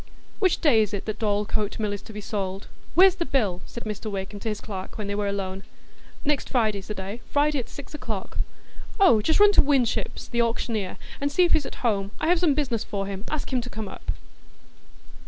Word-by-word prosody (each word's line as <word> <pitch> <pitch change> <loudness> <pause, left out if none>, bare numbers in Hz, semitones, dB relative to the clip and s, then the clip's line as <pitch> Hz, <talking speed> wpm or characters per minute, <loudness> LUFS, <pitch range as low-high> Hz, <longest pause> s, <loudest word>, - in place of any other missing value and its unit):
"Which 375 -4 +2
day 240 -9 +6
is 210 -1 0
it 195 - -5
that 215 - -3
Dorlcote 210 0 0
Mill 210 -2 0
is 200 - -4
to - - -11
be 210 0 -6
sold? 195 -2 -3 0.3
Where's 375 +2 +8
the 360 -2 -2
bill?" 210 - 0
said 235 - -7
Mr 215 0 -4
Wakem 200 0 -4
to 225 - -3
his 210 - -2
clerk 190 -3 -6
when 215 - -3
they 200 - -2
were 205 0 0
alone. 195 -1 -2 0.6
"Next 290 -1 +1
Friday 220 -5 +2
is 190 - -12
the 210 - -4
day,—Friday 255 +9 0
at 245 - -5
six 285 - -10
o'clock." 220 -9 -4 0.6
"Oh, 355 - +6
just 320 - +2
run 415 0 +8
to - - +7
Winship's 275 -5 +1
the 235 - +1
auctioneer, 230 -4 -1 0.2
and 285 0 +1
see 360 - +4
if 345 - +2
he's 295 - +3
at - - -8
home. 200 -4 +2
I 315 - +1
have 355 -1 +4
some 325 -5 +3
business 255 -7 0
for 195 -1 -3
him; 195 +1 -5
ask 300 -3 -3
him 250 - +2
to 245 - -7
come 220 -3 -5
up." - - -10
220 Hz, 220 wpm, -26 LUFS, 200-280 Hz, 0.6 s, Where's